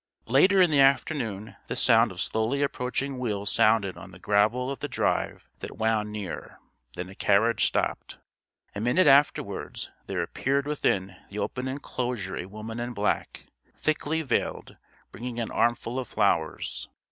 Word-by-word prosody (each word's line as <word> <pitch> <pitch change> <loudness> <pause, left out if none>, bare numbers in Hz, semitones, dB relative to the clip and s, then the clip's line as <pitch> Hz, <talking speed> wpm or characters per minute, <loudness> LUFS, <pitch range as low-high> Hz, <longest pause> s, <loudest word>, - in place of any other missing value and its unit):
Later 185 - +5
in 180 -3 +5
the 145 - +3
afternoon 135 -6 +1
the - - -3
sound - - +4
of - - -9
slowly 115 +6 0
approaching 135 0 -2
wheels 105 -4 -2
sounded 105 -5 +3
on 95 +1 -10
the 90 - -13
gravel 105 +7 +2
of 140 - -5
the 145 - -3
drive 140 - -1
that - - -8
wound 110 -1 0
near: 105 -5 -6 0.4
then 90 - -5
a 95 - -11
carriage 105 +4 +3
stopped. - - -2 0.6
A 100 - -4
minute 125 +11 +3
afterwards 140 +1 +2 0.2
there - - -1
appeared 140 +1 -1
within 100 -10 -1
the 100 - -8
open 125 +4 -3
enclosure 125 -6 -3
a 90 - -5
woman 110 +3 -7
in 120 +1 -3
black, 105 +1 -1 0.3
thickly 155 +1 -1
veiled, 140 - -2 0.4
bringing 120 +2 -6
an 115 - -3
armful 120 +1 0
of 125 - -5
flowers. - - -1
120 Hz, 155 wpm, -27 LUFS, 105-135 Hz, 0.6 s, Later